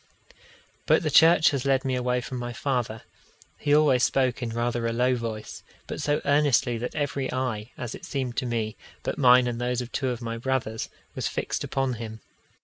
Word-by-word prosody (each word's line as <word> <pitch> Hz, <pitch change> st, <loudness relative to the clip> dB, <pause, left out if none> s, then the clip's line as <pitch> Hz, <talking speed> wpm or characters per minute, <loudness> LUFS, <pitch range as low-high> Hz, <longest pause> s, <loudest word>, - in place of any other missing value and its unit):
But -, -, +4 dB
the -, -, 0 dB
church 165 Hz, 0 st, +6 dB
has 140 Hz, -3 st, -2 dB
led 135 Hz, -1 st, +1 dB
me 130 Hz, -, 0 dB
away 125 Hz, 0 st, 0 dB
from 125 Hz, +1 st, -5 dB
my 120 Hz, 0 st, -4 dB
father. 120 Hz, -4 st, -2 dB, 0.6 s
He 145 Hz, -, -1 dB
always 145 Hz, -5 st, +4 dB
spoke 130 Hz, 0 st, +1 dB
in 120 Hz, -, -2 dB
rather 120 Hz, 0 st, -1 dB
a -, -, 0 dB
low 125 Hz, +2 st, +2 dB
voice, 110 Hz, -3 st, -5 dB, 0.2 s
but -, -, -5 dB
so 145 Hz, 0 st, +1 dB
earnestly 140 Hz, -5 st, +3 dB
that 125 Hz, -, -4 dB
every 140 Hz, -2 st, -2 dB
eye, 125 Hz, -4 st, -2 dB
as 120 Hz, -2 st, -5 dB
it -, -, -9 dB
seemed 130 Hz, -4 st, -3 dB
to 125 Hz, -, 0 dB
me, 110 Hz, -2 st, -2 dB, 0.3 s
but -, -, -3 dB
mine 125 Hz, -2 st, +6 dB
and 120 Hz, -1 st, -3 dB
those 125 Hz, 0 st, 0 dB
of 125 Hz, -1 st, -5 dB
two 135 Hz, -2 st, -1 dB
of 120 Hz, -2 st, -3 dB
my 115 Hz, -1 st, -4 dB
brothers, 120 Hz, -3 st, -2 dB, 0.2 s
was -, -, -2 dB
fixed -, -, -3 dB
upon 135 Hz, -1 st, -1 dB
him. 110 Hz, -1 st, -7 dB
125 Hz, 200 wpm, -26 LUFS, 115-135 Hz, 0.6 s, church